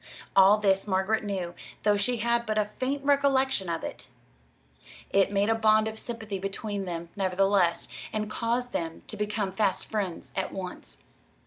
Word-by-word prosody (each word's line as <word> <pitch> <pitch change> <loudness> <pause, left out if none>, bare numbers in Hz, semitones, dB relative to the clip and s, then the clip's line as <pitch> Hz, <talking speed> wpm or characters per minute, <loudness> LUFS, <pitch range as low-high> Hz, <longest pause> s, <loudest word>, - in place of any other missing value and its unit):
All 195 +2 +7
this 195 -1 +2
Margaret 195 +3 +1
knew, 190 -4 -3 0.3
though 210 -1 +4
she 235 +5 0
had 235 +1 +1
but 215 0 0
a 210 - +3
faint 275 +2 -1
recollection 270 -7 +2
of 165 -1 -2
it. - - -7 1.0
It 195 0 +3
made 205 +2 +2
a - - +5
bond 220 -1 +4
of 220 0 -5
sympathy 220 -4 -4
between 195 +1 -3
them, 170 -1 -5
nevertheless, 195 -2 +2 0.2
and 215 -1 -2
caused 235 +3 -1
them 165 -1 -3
to - - -6
become 210 -1 -1
fast 195 -1 +1
friends 200 -6 -3
at 190 0 -1
once. 180 - -5
205 Hz, 160 wpm, -28 LUFS, 190-220 Hz, 1.0 s, All